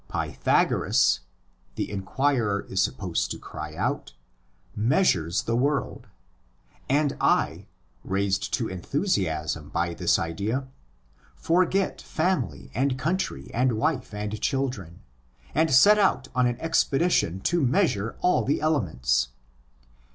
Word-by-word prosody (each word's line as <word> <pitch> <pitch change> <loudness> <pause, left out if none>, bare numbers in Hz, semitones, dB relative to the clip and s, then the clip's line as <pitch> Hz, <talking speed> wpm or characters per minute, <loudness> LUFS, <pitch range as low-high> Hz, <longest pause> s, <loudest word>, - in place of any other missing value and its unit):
Pythagoras - - +2 0.6
(the - - -3
inquirer 105 +1 0
is 95 0 0
supposed 90 -5 -1
to - - -4
cry - - -8
out) - - -2 0.6
measures 105 - +2
the 115 - -1
world; 140 +3 -1 0.8
and 145 +1 +2
I, - - +1 0.4
raised 95 0 -1
to - - -2
enthusiasm 85 - -2
by 85 0 -1
this - - +2
idea, 105 +11 -2 0.7
forget 185 +3 +1
family 115 - -2
and 130 +3 0
country 155 - -2
and 125 +1 +2
wife 130 +4 -1
and 105 +1 -5
children, 125 - -2 0.5
and 160 +1 +2
set 205 +12 +7
out 140 -9 +2
on 125 -1 +3
an 120 0 -2
expedition 160 - +1
to 175 - +1
measure 125 - +1
all 180 - +3
the 140 - 0
elements. 65 - +1
120 Hz, 115 wpm, -26 LUFS, 95-150 Hz, 0.8 s, set